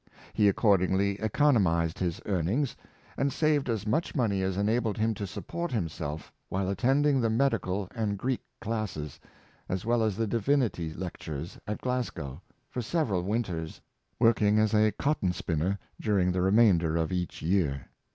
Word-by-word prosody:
He 105 -2 +4
accordingly 100 -1 +2
economized 100 - +2
his 85 -3 -1
earnings, 100 - 0 0.4
and 140 0 +1
saved 150 -3 +1
as 110 -3 -1
much 125 +13 0
money 105 -8 +1
as 95 0 -1
enabled 110 +2 +1
him 110 +1 +1
to 100 -1 -5
support 170 - -5
himself 80 - -4 0.2
while 95 0 -1
attending 135 +7 +2
the 115 - +2
Medical 110 -6 0
and 105 -4 -1
Greek 130 +4 -1 0.2
classes, 105 - -4 0.5
as 95 +1 -2
well 120 0 +2
as 110 -3 0
the 115 - +1
Divinity 115 - 0
Lectures, 80 -2 -6
at 105 - -3
Glasgow, 120 - -3 0.3
for 125 - -4
sev 150 +4 0
eral 90 -3 0
winters, 95 -7 -2 0.4
working 110 -3 +4
as 110 0 +3
a 110 0 +4
cotton 105 -8 0
spinner 85 +4 -1 0.2
during 95 -4 +2
the 90 0 0
remainder 95 -5 +4
of 80 0 0
each 90 -1 -3
year. 80 -7 +1
100 Hz, 150 wpm, -29 LUFS, 90-115 Hz, 0.5 s, He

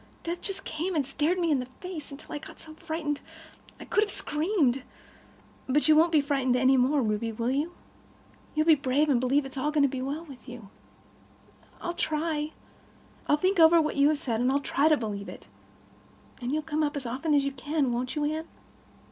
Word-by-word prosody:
Death 340 +1 -4
just 390 -2 -3
came 335 +4 -3
and 290 -3 +1
stared 295 +6 0
me 340 -3 +1
in 285 - +3
the 250 - -5
face, 310 +4 -8
until 275 0 -10
I 295 - -3
got - - -12
so 315 - -11
frightened 315 -2 -3 0.6
I - - -9
could 420 - +2
have 420 - -3
screamed. 300 - 0 0.9
"But 295 +4 +3
you 310 - +7
won't 325 +2 +5
be 310 -3 +5
frightened 270 -3 +1
any 260 +1 +4
more, 265 +2 +3
Ruby, 215 +1 -1
will 230 +3 -1
you? 300 +6 -1 0.8
You'll 310 0 +2
be 325 - +7
brave, 285 +1 +1
and 260 -4 +3
believe 265 +4 +2
that 270 0 -7
all 280 - -1
is 300 - -6
going 295 - +4
to - - +5
be 260 -1 -4
well 290 +5 -4
with 270 -3 -12
you." 235 -5 -10 1.1
"I'll 345 - -3
try. 310 -1 -1 0.7
I'll 295 - +4
think 370 +3 +1
over 330 +1 +7
what 305 -1 0
you 280 +1 +5
have 305 - +1
said, 240 -6 -2
and 270 +3 +1
try 285 +3 +2
to 310 -1 +5
believe 205 -4 -4
it. - - -11 1.0
And 245 +1 -2
you'll 310 +1 0
come 310 0 -1
up 295 -1 0
as 270 - -5
often 275 +6 0
as 280 -1 +3
you 275 - -1
can, 280 0 -1
won't 250 +2 -2
you, 300 -1 0
Anne?" 315 +2 -2
295 Hz, 215 wpm, -28 LUFS, 260-315 Hz, 1.1 s, you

